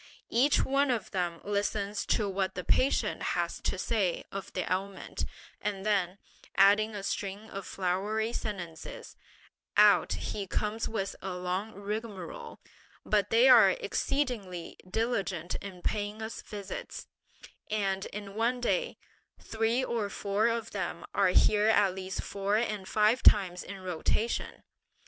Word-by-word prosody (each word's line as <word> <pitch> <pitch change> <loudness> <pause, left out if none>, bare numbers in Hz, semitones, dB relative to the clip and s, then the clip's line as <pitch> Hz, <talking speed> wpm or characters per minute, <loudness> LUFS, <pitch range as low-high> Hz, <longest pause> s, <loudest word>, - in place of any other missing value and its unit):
Each 275 +5 +4
one 275 +1 +2
of 235 -6 -1
them 175 -3 -2
listens 205 0 -1
to 210 - +2
what 190 -1 -1
the 180 - -4
patient 260 +10 +2 0.2
has - - -1
to - - -1
say 200 -7 0
of 195 -1 -6
the 185 - -1
ailment, 190 +1 -3 0.4
and 200 -1 -3
then, 195 -3 +1 0.4
adding 205 +2 +5
a 200 - -5
string 200 +2 -4
of 195 -1 -6
flowery 205 +5 -1
sentences, 180 -9 -6 0.6
out - - +6
he 200 -2 -4
comes 210 +4 -1
with 200 -3 -2
a 190 -1 -4
long 185 +4 -3
rigmarole; 215 - -6 0.5
but 205 -2 +2
they 235 +3 +6
are 250 -4 +9
exceedingly 245 - -2
diligent 195 -6 -1
in 185 -3 -9
paying 210 0 -2
us 220 - -5
visits; 200 -2 -7 0.6
and 195 -2 0
in 205 -1 -7
one 235 +4 +1
day, 480 - 0 0.4
three 225 +3 0
or 230 -5 -1
four 200 +2 0
of 230 -1 -1
them 180 -4 -4
are 200 - +4
here 210 +3 +4
at 205 -4 +4
least 190 0 -4
four 200 +1 0
and 210 -4 -2
five 215 +5 +3
times 180 -3 +5
in 195 0 -8
rotation! 185 +5 -1
205 Hz, 140 wpm, -30 LUFS, 190-225 Hz, 0.6 s, are